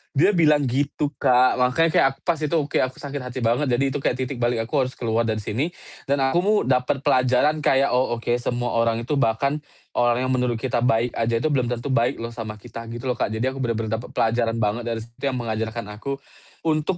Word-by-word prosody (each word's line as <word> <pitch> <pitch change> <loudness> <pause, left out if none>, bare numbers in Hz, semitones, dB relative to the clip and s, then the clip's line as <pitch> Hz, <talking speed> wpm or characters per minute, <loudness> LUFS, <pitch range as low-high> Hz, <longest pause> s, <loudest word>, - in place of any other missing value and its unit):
Dia 155 +9 +5
bilang, 150 -6 +4
gitu 140 +3 -1
Kak, 125 0 +4
makanya 125 +7 +3
kayak - - +5
aku - - -33
pas 170 -3 0
itu, 155 +1 -1
oke 150 -3 0
aku 130 0 -1
sakit 145 -1 -4
hati 125 +1 -6
banget. 120 +6 +2
Jadi, 125 +2 +2
itu - - -1
kayak 125 - +1
titik 130 +1 -5
balik, 120 -1 +1
"Aku 115 - -16
harus 130 - -7
keluar 115 -1 0
dari 110 -1 -1
sini," 125 +10 -1 0.4
dan 140 - +3
aku 170 - +1
mu 205 +3 +2
dapet 130 +1 +1
pelajaran 130 +3 +3
kayak, 135 -1 +3
"Oh, 125 -1 +2
oke 115 - -3
semua 120 0 -2
orang 115 0 +1
itu 135 - -2
bahkan 140 +5 +1 0.4
orang 120 +1 +2
yang 130 - -1
menurut 125 -1 +1
kita 120 +1 -1
baik 120 -1 +2
aja 115 0 0
itu 155 - +1
belum 130 -4 +1
tentu 120 +3 -3
baik 120 +2 +2
loh 115 - -4
sama 110 -2 -6
kita," 115 +2 -9
gitu 120 0 -7
loh, 125 - +1
Kak. - - +1
Jadi, 110 +3 -1
aku 135 - -8
bener-bener 115 -3 -1
dapet 120 - -10
pelajaran 115 0 +1
banget 115 +1 0
dari 115 -1 -2
situ 115 0 -24
yang 130 -2 -1
mengajarkan 115 -1 -3
aku 140 +5 -4 0.5
untuk 155 +3 +1
125 Hz, 225 wpm, -23 LUFS, 115-140 Hz, 0.5 s, Dia